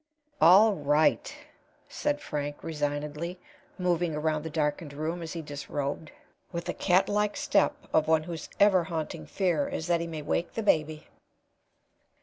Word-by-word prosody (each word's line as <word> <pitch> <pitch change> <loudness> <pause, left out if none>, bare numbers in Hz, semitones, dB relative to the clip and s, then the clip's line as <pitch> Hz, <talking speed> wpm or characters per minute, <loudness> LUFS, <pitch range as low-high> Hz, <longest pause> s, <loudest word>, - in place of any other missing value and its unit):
'" 295 -1 -36 0.2
"All 215 +1 +5
right," 150 -2 +2 0.6
said 295 0 -2
Frank, 145 0 -4
resignedly, 150 +3 -3 0.4
moving 175 -3 0
around 155 0 0
the 160 - -5
darkened 150 -1 -2
room, 160 +4 -3
as 165 -1 -6
he 165 -2 -5
disrobed, 145 +1 -4 0.4
with 170 -2 -4
the - - -2
catlike 205 +3 +2
step 200 - +2 0.2
of 155 -1 +3
one 160 -1 +3
whose 165 -1 -7
ever 195 -4 +5
haunting 160 -2 -5
fear 175 -7 0
is 160 - -4
that 170 -1 +1
he 170 - -3
may 160 -2 -6
wake 170 +3 -1
the 225 - -2
baby. 155 -5 +1
160 Hz, 150 wpm, -28 LUFS, 150-180 Hz, 0.6 s, All